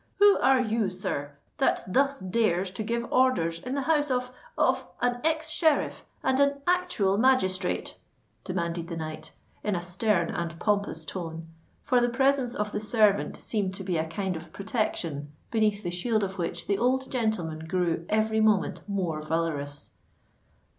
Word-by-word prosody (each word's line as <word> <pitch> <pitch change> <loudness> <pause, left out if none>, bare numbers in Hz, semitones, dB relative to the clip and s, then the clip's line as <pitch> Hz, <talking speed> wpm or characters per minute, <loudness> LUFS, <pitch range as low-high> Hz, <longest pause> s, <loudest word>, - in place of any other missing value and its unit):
"Who 410 0 +6
are 270 -1 +5
you, 225 -4 +1
sir, 145 -6 -4 0.3
that 270 - +2
thus 275 +7 +2
dares 185 -2 +1
to 195 - -5
give 235 +2 -1
orders 180 -11 +3
in 250 +9 -4
the 280 - -1
house 295 -1 +2
of—of 255 - -1
an 245 0 0
ex 315 0 0
sheriff 315 -4 +1 0.2
and 265 0 +2
an 280 0 +2
actual 350 - +2
magistrate?" 195 -8 +1 0.4
demanded 170 -2 -2
the 170 -1 -5
knight, 155 -1 -6 0.3
in 210 -2 0
a 175 - -1
stern 180 0 +1
and 170 -1 -4
pompous 200 -6 0
tone, 165 0 -6 0.3
for 250 -1 +3
the 240 - +2
presence 265 0 +2
of 210 0 -2
the 210 - -2
servant 210 -2 +2
seemed 195 -4 -1
to 195 - -5
be 180 -3 -1
a 160 0 -1
kind 185 +2 -2
of 160 - -8
protection 170 - -2 0.2
beneath 215 -2 +1
the 175 - -2
shield 215 +5 0
of 190 0 -4
which 170 - -2
the 200 - 0
old 260 +2 +1
gentleman 175 -10 -1
grew 175 -2 0
every 220 +1 +2
moment 215 -3 +2
more 175 -6 -1
valourous. 155 -3 -3
205 Hz, 160 wpm, -27 LUFS, 170-250 Hz, 0.4 s, Who